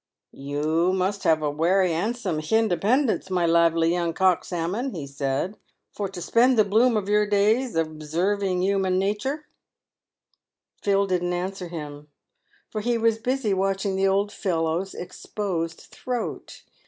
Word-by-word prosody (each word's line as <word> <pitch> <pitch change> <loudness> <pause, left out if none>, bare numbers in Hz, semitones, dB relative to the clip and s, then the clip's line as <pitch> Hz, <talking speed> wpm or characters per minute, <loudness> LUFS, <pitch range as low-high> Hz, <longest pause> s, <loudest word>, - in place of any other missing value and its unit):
" - - -64 0.2
You 160 +5 +1
must 190 +2 -1
have 160 -1 +3
a 150 - 0
werry 175 +4 +2
'andsome 200 -1 -2
hindependence, 220 - +1
my 180 -2 +1
lively 165 0 +3
young 170 -1 0
cock 185 -1 +2
salmon," 190 +9 -3
he 155 -4 -5
said, 140 +7 -2 0.2
" - - -55
for 200 -2 -3
to 190 -1 -8
spend 245 +6 +3
the 215 - +5
bloom 225 +3 +3
of 200 -2 -2
your 210 0 +3
days 215 +4 +2
observing 175 +5 -1
human 190 -1 +1
natur." 210 +10 -1 1.4
Phil 200 0 +2
didn't 180 -2 -1
answer 180 +1 -3
him, 150 -3 -8 0.6
for 215 - -3
he 240 +2 +1
was 225 -1 +2
busy 250 -3 0
watching 195 +1 0
the 195 0 +2
old 200 +2 +1
fellow's 170 -1 -1
exposed 175 -2 -4
throat. 250 -2 -6
190 Hz, 145 wpm, -25 LUFS, 170-210 Hz, 1.4 s, the